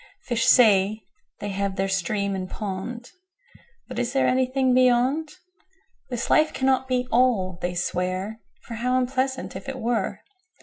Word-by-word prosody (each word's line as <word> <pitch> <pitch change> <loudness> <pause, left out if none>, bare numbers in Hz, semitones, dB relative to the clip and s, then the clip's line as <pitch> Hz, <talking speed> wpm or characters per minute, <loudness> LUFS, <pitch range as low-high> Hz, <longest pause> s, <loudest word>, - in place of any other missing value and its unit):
5Fish 235 -2 0
say, 215 -3 +5 0.4
they 205 - -3
have 200 0 -2
their 195 0 0
Stream 195 +1 -1
and 185 -1 -4
Pond;6But 255 - -9
is 245 +1 -2
there 270 - +2
anything 260 0 +2
Beyond?7This 295 - -1
life 310 0 +4
cannot 265 0 +1
be 250 -1 0
All, 220 -8 +2
they 175 0 -2
swear,8For 185 +6 -4
how 250 +2 +1
unpleasant, 260 +1 -1
if - - -7
it 270 - -5
were! 240 -1 -2
245 Hz, 130 wpm, -24 LUFS, 200-265 Hz, 0.4 s, say